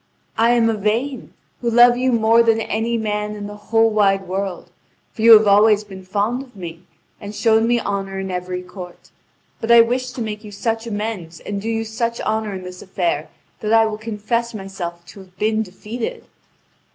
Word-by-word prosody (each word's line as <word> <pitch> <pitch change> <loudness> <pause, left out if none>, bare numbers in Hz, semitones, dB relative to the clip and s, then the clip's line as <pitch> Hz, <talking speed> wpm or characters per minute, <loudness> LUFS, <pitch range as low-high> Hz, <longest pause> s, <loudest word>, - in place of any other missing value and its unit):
"I 230 +2 +4
am 235 -1 +3
Yvain, 225 +5 -1 0.3
who 240 - 0
love 240 +1 +6
you 255 +1 +1
more 230 0 +4
than 225 -1 +3
any 225 +2 -1
man 210 -1 -2
in 205 -1 -6
the 205 0 -7
whole 225 0 +4
wide 195 -3 +2
world, 190 0 -4 0.4
for - - -7
you 230 +1 +9
have 215 0 +8
always 210 +1 +5
been 190 -2 -11
fond 205 +6 -1
of 255 -4 -14
me 170 -3 -8 0.4
and 205 +1 -8
shown 225 0 +3
me 240 0 +3
honour 195 -2 -3
in 190 -1 -4
every 180 0 -4
court. 180 -1 -11 0.5
But 225 - -5
I 235 0 +9
wish 250 +2 0
to 240 - -6
make 210 0 -5
you 210 - -10
such 225 +3 -2
amends 205 -7 -4
and 200 -1 -4
do 225 - -3
you 225 0 -1
such 230 +1 -2
honour 215 -2 -1
in 185 - -7
this 180 0 -9
affair 175 -5 -2 0.3
that 215 +1 -1
I 225 0 +6
will 215 -1 -3
confess 230 +2 -2
myself 175 -4 -6
to 195 - -13
have 185 -1 -16
been 215 +2 +1
defeated." 220 +4 -6
215 Hz, 195 wpm, -20 LUFS, 195-230 Hz, 0.5 s, you